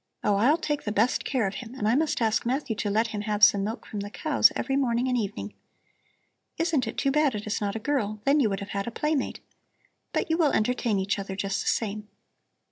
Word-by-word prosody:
Oh, 205 -1 +2
I'll 265 +10 +4
take 295 -3 -2
the 210 - -3
best 220 +4 +1
care 255 -5 0
of 195 - -2
him, 240 +1 -10
and 210 -5 -2
I 220 - +3
must 295 -3 +1
ask 220 -1 +1
Matthew 250 -1 -1
to 210 - -1
let 220 +3 +1
him 210 -1 -4
have 210 -1 -2
some 200 -1 +7
milk 220 +3 -4
from 210 - -6
the 200 0 -5
cows 275 -1 +3
every 270 +2 -1
morning 250 -2 +1
and 250 - +1
evening. 210 -4 -3 1.0
Isn't 320 -7 +1
it - - -5
too 275 - +1
bad 295 -4 +2
it 210 - -5
is 210 0 -2
not 200 0 -2
a - - -2
girl; 215 -7 0
then 285 +2 +4
you 235 -6 +3
would 195 -1 -3
have 200 +1 -4
a - - 0
playmate. 300 +3 -2 0.7
But - - -1
you 325 - +1
will 305 -4 +3
entertain 225 -1 +1
each 195 +1 -1
other 195 -1 -5
just 195 0 -2
the - - -6
same. 210 -1 -1
225 Hz, 235 wpm, -26 LUFS, 205-270 Hz, 1.0 s, some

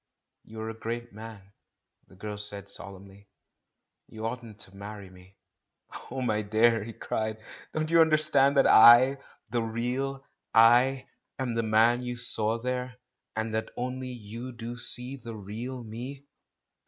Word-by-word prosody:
"You 110 0 -9
are 110 0 -4
a - - -8
great 120 +1 -5
man," 105 -2 -11 0.5
said - - -41
the - - -17
girl 105 +2 -6
solemnly; 100 -1 -8 0.8
"you 110 0 -7
oughtn't 115 -2 -5
to 95 -1 -10
marry 100 -1 -9
me." 90 +1 -18 0.7
"Oh, 130 +1 -4
my 110 -3 +1
dearest 105 0 -11 0.2
dear," 110 - -3
he 115 - -7
cried, 110 0 -3 0.3
"don't 155 +1 -2
you 165 0 +6
understand 155 -3 +3
that 135 - +6
I 125 +4 +8
— - - -36
the 120 0 +1
real 125 +4 -3 0.3
'I' 125 +4 +5 0.2
— - - -55
am 130 -3 -2
the 115 - +1
man 115 +2 +3
you 125 0 -4
saw 115 -2 +1
there, 125 +1 -3 0.4
and 110 0 -2
that 110 0 -2
only 130 +1 -4
you 120 +1 -7
do 120 0 -6
see 125 +2 -2
the 115 -3 -8
real 115 +5 -6
'me' 125 +5 -8
115 Hz, 160 wpm, -28 LUFS, 110-125 Hz, 0.8 s, I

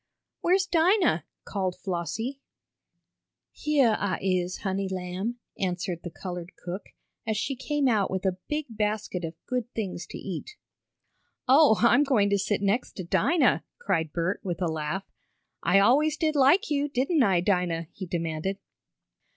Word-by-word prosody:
"Where's 375 +2 +3
Dinah?" 365 +2 +3 0.2
called 190 -3 -2
Flossie. 215 +9 -3 1.1
"Heah 275 -7 +2
I 195 -2 0
is, 185 -1 -1
honey 195 -1 -1
lamb," 190 +5 -3 0.2
answered 180 -2 -2
the 175 - -6
colored 180 0 -7
cook, 180 +3 -7 0.4
as 220 -1 0
she 270 +5 -1
came 285 +2 0
out 215 -5 +2
with 190 0 -3
a 185 -1 0
big 300 0 -1
basket 210 -4 -2
of 165 0 -4
good 250 -1 -2
things 185 -5 -4
to - - -7
eat. 200 - -6 0.9
"Oh, 270 -4 +6
I'm 240 +4 +6
going 220 -8 +2
to 200 - +3
sit 200 +1 0
next 205 +5 0
to 185 - -6
Dinah!" 190 - +2
cried 165 - -1
Bert 170 +4 -1
with 175 -4 -3
a 180 - 0
laugh. 160 +5 -2 0.6
"I - - +4
always 290 +10 +4
did 310 -2 0
like 285 +6 +4
you, 290 0 +1
didn't 275 +4 +1
I, 195 -7 +4
Dinah?" 175 -3 0
he 190 - -7
demanded. 170 +2 -2
200 Hz, 150 wpm, -27 LUFS, 180-265 Hz, 1.1 s, Oh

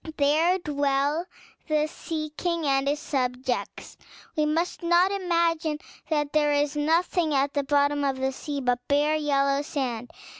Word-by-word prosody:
There 310 +6 +3
dwell 290 0 0 0.4
the 305 -1 +2
Sea 310 -1 -5
King 335 -1 -1
and 270 -1 +2
his 290 +1 0
subjects. 255 -3 -3 0.4
We 305 -1 +2
must 330 +5 -1
not 350 +2 +3
imagine 335 -5 0 0.3
that 295 -2 0
there 295 -1 +3
is 290 0 +1
nothing 320 +1 +1
at 275 +1 +1
the 285 - 0
bottom 285 +1 +2
of 270 -1 0
the 265 0 0
sea 285 +1 -5
but 245 -1 +1
bare 295 +2 +2
yellow 280 -2 +1
sand. 250 -5 -3
295 Hz, 150 wpm, -26 LUFS, 275-320 Hz, 0.4 s, There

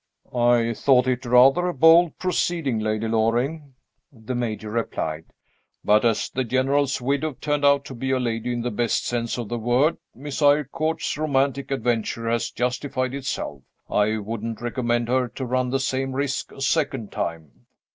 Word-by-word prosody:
"I 120 -1 +3
thought 125 +1 +3
it 125 0 -1
rather 135 +8 +5
a 180 - -2
bold 165 +3 +5
proceeding, 170 -8 -1
Lady 110 +1 -1
Loring," 125 +6 0 0.4
the 115 -1 -7
Major 110 -3 -3
replied. 80 -8 -3 0.6
"But 105 +1 +4
as 115 -2 +1
the 130 - -1
General's 135 +3 +1
widow 140 +4 -1
turned 145 -1 -1
out 140 0 +4
to - - -8
be 130 +2 -4
a 130 -1 +2
lady, 120 -1 -2
in 120 -1 -2
the 125 - -2
best 115 +1 0
sense 120 -1 -2
of 120 -3 -4
the 120 - -3
word, 125 +8 +2 0.2
Miss 145 +4 -6
Eyrecourt's 150 +2 +1
romantic 140 -2 0
adventure 115 -3 -1
has 115 0 0
justified 130 +1 -2
itself. 130 - -4 0.3
I 105 +1 +2
wouldn't 110 +1 -5
recommend 120 -1 -1
her 125 +1 +1
to 130 +2 -6
run 125 0 0
the 135 +1 0
same 135 0 -1
risk 140 0 -2
a - - -11
second 135 -6 0
time." 80 -3 -5
125 Hz, 165 wpm, -23 LUFS, 115-140 Hz, 0.6 s, rather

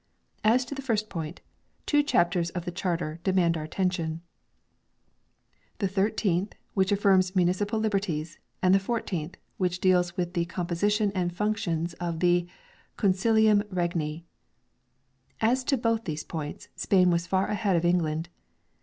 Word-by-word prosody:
As 245 +4 +4
to 255 - -6
the 275 - -5
first 215 -5 -1
point, 165 -2 -5 0.4
two 295 -1 +4
chapters 175 - +1
of 175 0 -5
the 175 - -3
Charter 170 -3 -2
de 190 - +2
mand 175 -3 +3
our 160 - -3
attention, 165 -1 -2 1.5
the 200 - 0
isth, 195 -1 0 0.2
which 190 -1 +2
affirms 195 -2 +3
municipal 185 +5 +1
liberties, 195 -7 -2 0.2
and 185 0 +5
the 195 - +6
i4th 190 -6 -3 0.2
which 180 -1 0
deals 180 -1 +2
with 175 -1 -2
the 170 -2 0
composi 175 +2 -1
tion 210 -1 +1
and 180 -3 -1
functions 180 -5 -1
of 170 -2 -3
the 175 0 +3 0.3
" - - -33
consilium 215 +2 +4
regni 170 -3 -2 0.6
". 130 +1 -43
As 255 +1 0
to 275 - +2
both 230 -1 0
these 155 -1 -3
points, 155 -3 -6
Spain 180 -2 +3
was 170 0 0
far 190 +1 +1
ahead 205 -3 0
of 170 0 +1
England. 165 -1 +1
180 Hz, 155 wpm, -27 LUFS, 170-205 Hz, 1.5 s, the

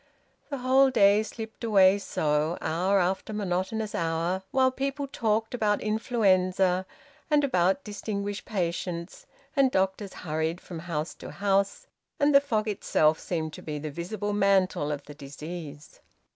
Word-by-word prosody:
The 280 - -3
whole 265 +1 +4
day 205 -4 +5
slipped 220 +1 -8
away 200 -3 +5
so, 155 -2 0
hour 185 +5 +1
after 190 +3 0
monotonous 205 +2 -2
hour, 165 +3 -1
while 260 -1 +3
people 275 +2 -2
talked 225 -4 -1
about 210 -4 +1
influenza 190 -4 +1 0.4
and 295 -1 +4
about 190 -1 +2
distinguished 205 -1 -4
patients, 175 -2 -3 0.3
and 275 -2 +4
doctors 190 -1 -1
hurried 160 +2 -1
from 175 -3 -8
house 160 -1 -3
to - - -7
house, 200 0 0 0.3
and 290 0 +3
the 280 - +8
fog 220 -6 -1
itself 160 -6 +2
seemed 160 -3 -3
to - - -9
be 150 -1 -5
the 150 +1 -5
visible 205 +6 -4
mantle 190 -6 +2
of 145 -1 -4
the 145 - -10
disease. 150 +1 -9
195 Hz, 145 wpm, -27 LUFS, 170-220 Hz, 0.4 s, the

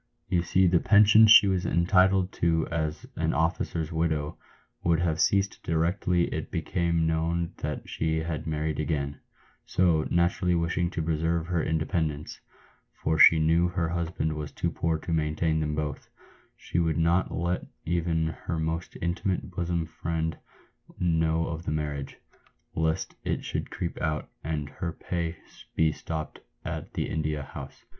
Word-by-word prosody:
You 90 - +2
see 90 +3 +3
the 85 -1 +4
pension 105 +2 +7
she 105 -1 +9
was 95 -2 +1
entitled 95 +2 +3
to 80 -2 +2
as 80 -2 -2
an - - 0
officer's 80 0 -1
widow 80 -2 -1 0.5
would 85 -2 +3
have 85 -1 0
ceased 100 0 +2
directly 85 +2 +1
it - - -4
became 85 -2 0
known 80 +1 0
that - - -4
she 80 0 -1
had 80 -1 -4
married 75 -1 -2
again; 70 -2 -2 0.4
so, 85 -4 +2
naturally 90 +1 +2
wishing 85 +1 0
to 80 -2 -3
preserve 80 +1 0
her 85 -1 0
independ 80 0 0
ence 75 +1 -9 0.3
— - - -37
for 80 0 0
she 80 - +9
knew 80 +2 +3
her 85 -2 -1
husband 85 -2 -1
was 75 -1 -5
too - - -2
poor 80 -1 0
to 85 +2 -4
maintain 80 0 +1
them 75 -1 -1
both 75 -2 -4 0.2
— - - -30
she 85 - -2
would 80 -3 +1
not 85 +3 +2
let 85 +1 -2 0.2
even 85 -1 0
her 80 +1 -4
most 80 +2 -3
intimate 90 +2 -1
bosom 85 -1 -1
friend 80 -1 -3 0.6
know 80 -1 +2
of 80 0 -5
the - - -1
marriage, 75 -3 -3 0.6
lest 80 +3 -1
it - - -2
should - - -3
creep 85 - -4
out, 75 -2 -2
and 75 -2 -2
her 85 +4 -4
pay 85 0 -3 0.4
be 80 -1 +3
stopped 80 0 -5 0.3
at - - -5
the - - -1
India 75 -2 -2
House." - - -10
80 Hz, 160 wpm, -27 LUFS, 80-85 Hz, 0.6 s, she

